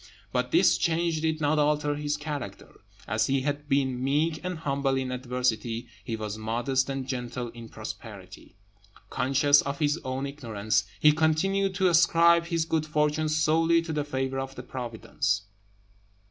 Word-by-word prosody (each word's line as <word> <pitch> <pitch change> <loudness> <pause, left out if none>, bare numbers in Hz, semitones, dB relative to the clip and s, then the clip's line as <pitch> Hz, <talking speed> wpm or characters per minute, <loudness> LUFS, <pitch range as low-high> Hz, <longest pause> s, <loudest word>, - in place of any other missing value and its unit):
But - - 0
this - - +4
change 165 -1 0
did 160 -1 -1
not 150 +1 +2
alter 150 0 +2
his 145 0 -2
character. 145 -9 -7 0.3
As 110 +1 +1
he 135 0 +1
had 145 +1 -3
been 130 -2 +1
meek 155 +4 0
and 180 -1 -3
humble 140 -3 0
in 130 -1 -2
adversity, 125 -2 -2
he 115 - -3
was 110 -1 -5
modest 120 +5 0
and 135 -1 -3
gentle 125 -2 -4
in 115 -1 -11
prosperity. 100 -4 -9 0.6
Conscious 140 +2 +4
of 140 0 -4
his 150 +1 +1
own 130 +1 -3
ignorance, 115 -7 -1
he 150 - +7
continued 185 +5 +1
to 190 -1 +3
ascribe 170 0 +5
his 165 -2 0
good 160 -1 -1
fortune 150 0 +1
solely 160 +2 +3
to 165 -1 -4
the 150 -1 0
favour 135 -2 -2
of 135 0 -5
Providence. 115 -5 -2
140 Hz, 155 wpm, -27 LUFS, 125-155 Hz, 0.6 s, he